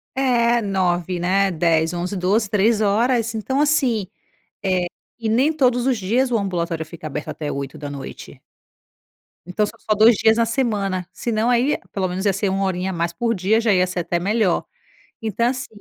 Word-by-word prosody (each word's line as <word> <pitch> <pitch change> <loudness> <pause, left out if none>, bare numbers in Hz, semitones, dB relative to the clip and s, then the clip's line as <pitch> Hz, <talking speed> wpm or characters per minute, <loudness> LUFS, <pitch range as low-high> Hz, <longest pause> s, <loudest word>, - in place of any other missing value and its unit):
É, 240 -3 +2
9h, 180 -3 -1
né, 195 +2 +2
10h, 165 0 +1
11h, 180 +3 -3
12h, 200 +3 +1
3 215 +1 +2
horas. 230 +3 +1
Então, 265 +6 -1
assim, 255 -10 +1 0.6
eh, 185 -2 +1 0.3
e 225 -2 -3
nem 260 +8 +3
todos 250 -5 +2
os 260 -4 +1
dias 245 +7 +1
o 230 - +2
ambulatório 170 -4 -2
fica 155 -1 -8
aberto 150 +1 -5
até 150 -2 -4
20h. 140 0 -7 1.0
Então 195 +4 0
são - - -9
só 215 - 0
2 220 +2 +6
dias 220 +2 +3
na 230 - +3
semana, 205 -7 -1
se 235 - -4
não 220 +2 +1
aí 250 +4 +2
pelo 190 -2 -1
menos 185 +3 -4
ia 200 - +3
ser 200 0 -1
1 195 +1 -1
horinha 190 0 -1
a - - -5
mais 170 0 -1
por 230 +5 0
dia, 205 +3 +2
já 225 -3 +2
ia 185 0 +3
ser 180 0 -3
até 175 0 -1
melhor. 200 0 +1 0.6
Então 225 +2 0
assim, 260 +1 -3
200 Hz, 185 wpm, -21 LUFS, 180-235 Hz, 1.0 s, 2